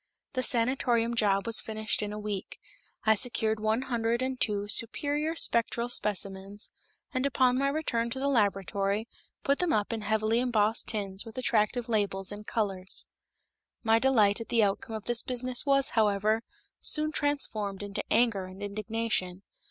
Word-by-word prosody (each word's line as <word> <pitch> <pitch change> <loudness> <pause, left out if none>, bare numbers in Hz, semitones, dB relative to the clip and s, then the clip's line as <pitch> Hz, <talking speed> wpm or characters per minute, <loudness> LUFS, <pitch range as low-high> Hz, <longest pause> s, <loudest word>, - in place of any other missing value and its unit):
The 255 - 0
sanatorium 235 -1 +1
job 200 -3 +2
was 230 -1 +3
finished 220 0 -1
in 210 0 -3
a 210 - -5
week. 210 -2 -5 0.5
I 220 - +5
secured 220 -1 +2
one 220 +3 0
hundred 235 -1 -1
and 260 -1 -3
two 205 -2 +1
superior 290 +9 +1
spectral 235 -4 0
specimens, 200 -2 0 0.4
and 255 -1 -1
upon 255 -2 +2
my 275 - +1
return 270 -6 -1
to 260 - -4
the 275 - -1
laboratory, 200 -3 0 0.4
put 280 +1 +1
them 355 -2 +1
up 210 +1 0
in 225 - -4
heavily 215 +2 +1
embossed 225 -3 +1
tins 195 -3 -2
with 225 0 -12
attractive 240 -1 0
labels 200 -4 0
in 205 +1 -8
colors. 195 -5 -3 0.8
My 225 -1 +4
delight 230 -5 +3
at 230 - -8
the 230 -2 +3
outcome 220 +4 -1
of 215 - -7
this 240 -1 +2
business 250 +1 -1
was, 275 -1 +4
however, 215 0 +2 0.4
soon 305 0 +4
transformed 220 -10 -1
to - - -2
anger 225 -5 +2
and 190 +2 -10
indignation. 205 -3 -2
225 Hz, 160 wpm, -29 LUFS, 205-245 Hz, 0.8 s, I